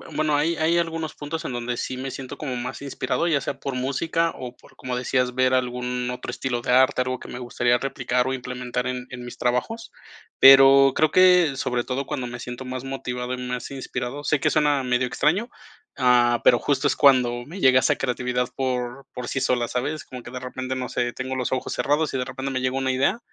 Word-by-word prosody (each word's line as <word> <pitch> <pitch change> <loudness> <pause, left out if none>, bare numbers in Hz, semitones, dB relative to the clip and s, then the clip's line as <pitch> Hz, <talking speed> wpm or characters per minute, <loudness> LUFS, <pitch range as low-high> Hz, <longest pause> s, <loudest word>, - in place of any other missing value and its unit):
bueno, 155 -1 +1
hay 160 +3 +1
hay 160 +2 +2
algunos 165 -2 -2
puntos 155 +2 -5
en - - -4
donde 120 0 -3
sí 130 +2 -4
me 135 +1 -4
siento 130 -1 -7
como 135 -4 -4
más 125 +2 -5
inspirado, 140 +4 -2
ya 150 -5 +2
sea 135 - -4
por 140 -2 -4
música 165 +6 0
o 125 -1 -7
por, - - -21
como 125 -1 -4
decías, 125 0 0
ver 130 0 +2
algún 125 -1 -1
otro 125 - -5
estilo 125 -2 -3
de 120 - -2
arte, 130 0 +4
algo 130 0 -2
que - - -11
me 125 - -7
gustaría 120 0 +1
replicar 125 -1 -1
o 130 - -1
implementar 125 -1 -4
en 125 0 -4
en 125 -1 -8
mis 120 - -9
trabajos, 125 - -2 0.5
pero 135 0 +8
creo 155 -1 +3
que, 180 -6 +5
sobre 125 -2 -1
todo 135 +2 -3
cuando 125 -1 -4
me 120 0 -7
siento 125 +2 -7
más 130 0 -6
motivado 125 -2 -4
y - - -3
más 125 0 -4
inspirado, 130 0 -5
sé 150 -1 +1
que - - +2
suena 150 -3 +2
medio 125 0 +1
extraño, 175 - 0 0.5
ah, 120 -2 +4
pero, 120 - +7
justo, 145 +3 0
es - - +1
cuando 125 -3 +4
me 175 +8 -9
llega 130 -4 +5
esa - - +2
creatividad 125 -1 -1
por 130 0 -3
por 125 -1 -6
sí 135 - -2
sola, 120 -2 +1
¿sabes?, 135 +6 -3
como 125 -1 -9
que 120 - -10
de 125 - -5
repente, 130 +1 -5
no 125 -1 -3
sé, 120 -1 -1
tengo 130 +2 -5
los 125 -1 -2
ojos 130 -1 -2
cerrados 145 +5 0
y - - 0
de 125 - -1
repente 135 +2 -5
me 130 - -1
llegó 130 +1 -1
una 130 -1 0
idea, 140 - +1
130 Hz, 225 wpm, -24 LUFS, 125-140 Hz, 0.5 s, pero